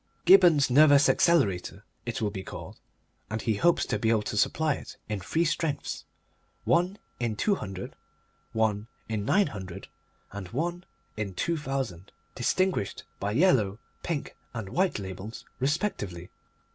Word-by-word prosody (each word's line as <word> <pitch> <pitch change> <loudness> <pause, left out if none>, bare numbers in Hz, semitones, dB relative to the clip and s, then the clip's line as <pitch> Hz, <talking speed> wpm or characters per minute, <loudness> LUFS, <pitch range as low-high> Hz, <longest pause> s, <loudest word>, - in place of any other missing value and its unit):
Gibberne's 175 -7 +7
Nervous 145 +1 +7
Accelerator 110 - +2 0.2
it - - -2
will 105 - 0
be 95 -2 -5
called, - - -9 0.5
and 110 - -2
he 110 - 0
hopes 170 +8 +3
to - - -1
be 110 - +1
able 110 -2 +3
to 105 - -4
supply 155 +8 +2
it - - -9
in 105 -2 -2
three 160 - 0
strengths: 155 -3 -2 0.6
one 180 +4 +2 0.2
in 120 -3 -1
200, 105 - -2 0.6
one 110 -1 0 0.2
in 110 -2 -2
900, 100 - 0 0.4
and 100 -3 -6
one 175 - -3 0.3
in 100 -4 -3
2000, 135 - -2 0.2
distinguished 175 - 0 0.2
by 100 +1 -1
yellow, 115 - +3 0.2
pink, 165 -5 -3 0.2
and 110 -4 -4
white 185 - +1
labels 95 +2 -7
respectively. 125 - -2
115 Hz, 135 wpm, -28 LUFS, 100-165 Hz, 0.6 s, Gibberne's